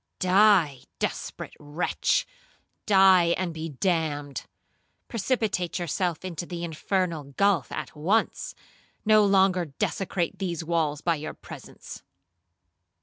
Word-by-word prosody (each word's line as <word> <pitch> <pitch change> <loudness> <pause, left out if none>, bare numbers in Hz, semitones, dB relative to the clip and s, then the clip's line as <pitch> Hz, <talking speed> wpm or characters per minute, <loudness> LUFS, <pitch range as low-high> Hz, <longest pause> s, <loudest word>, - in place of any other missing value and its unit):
Die, 185 -7 +4 0.2
desperate - - -4
wretch,—die 190 - +1
and 180 -3 -2
be 160 0 -5
damned. 150 -3 -2 0.6
Precipitate 220 -6 -1
yourself 175 0 -2
into 175 -1 -5
the 175 -1 -5
infernal 165 -3 -2
gulph 195 - +2
at - - -6
once, 190 +10 0 0.5
no 215 0 +6
longer 190 -3 +3
desecrate 170 +4 -2
these 175 -4 -3
walls 160 -3 0
by 170 - +2
your 155 0 -6
presence.' - - -11
175 Hz, 100 wpm, -26 LUFS, 160-195 Hz, 0.6 s, no